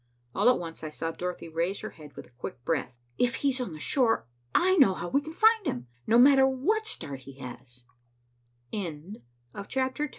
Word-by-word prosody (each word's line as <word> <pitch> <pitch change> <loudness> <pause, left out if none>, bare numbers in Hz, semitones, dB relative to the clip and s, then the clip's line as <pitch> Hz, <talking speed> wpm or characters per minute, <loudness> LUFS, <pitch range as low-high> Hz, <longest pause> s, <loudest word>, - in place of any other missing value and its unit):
All - - +4
at 250 - +4
once 165 -2 -7
I 155 - -3
saw 165 +2 -3
Dorothy 180 0 -5
raise 170 +4 -2
her 215 - -6
head 150 -2 -14
with - - -9
a - - -23
quick 120 0 -8
breath. 135 -6 -1 0.2
"If 240 -1 +2
he's 265 -2 +2
on 240 - -3
the 155 - -7
shore, 235 - +2 0.3
I 375 +1 +4
know 240 - +6
how 175 - -4
we 280 - +2
can 310 +2 -8
find 445 +5 +4
him, 120 0 -2 0.2
no 225 - +5
matter 265 +1 +7
what 400 +13 0
start 140 - -6
he 135 +1 -13
h 125 0 -9
190 Hz, 185 wpm, -28 LUFS, -, 0.3 s, matter